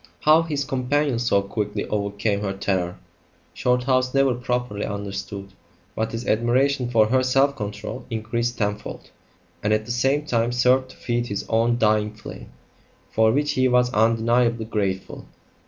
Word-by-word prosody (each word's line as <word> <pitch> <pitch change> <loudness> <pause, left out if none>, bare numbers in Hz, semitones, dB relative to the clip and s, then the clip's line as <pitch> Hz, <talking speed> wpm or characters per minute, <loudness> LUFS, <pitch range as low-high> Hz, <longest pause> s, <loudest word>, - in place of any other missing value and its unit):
How 155 +2 +6
his 150 -4 -2
companion 135 -1 0
so 100 -5 +2
quickly 105 +1 -3
overcame 100 0 -1
her 100 -2 -2
terror, 95 -2 -2 0.6
Shorthouse 130 +1 +1
never 135 -2 +4
properly 125 -4 -2
understood; 100 -1 -5 0.4
but 110 0 -2
his 115 +2 -5
admiration 125 +3 +1
for 110 -3 +3
her 130 +2 +3
self 135 +2 +2
control 105 +2 -6
increased 115 +1 -2
tenfold, 105 -1 -4 0.5
and 105 - 0
at 110 0 +1
the 120 - -5
same 135 +5 +1
time 120 -3 0
served 125 +1 +3
to - - -15
feed 120 0 -2
his 100 -2 -4
own 115 +1 +2
dying 105 -1 +1
flame 110 - -10 0.6
for 110 0 +3
which 145 +4 +1
he 130 -2 +2
was 125 0 +2
undeniably 115 +1 +2
grateful. 100 -4 -3
120 Hz, 150 wpm, -23 LUFS, 105-130 Hz, 0.6 s, How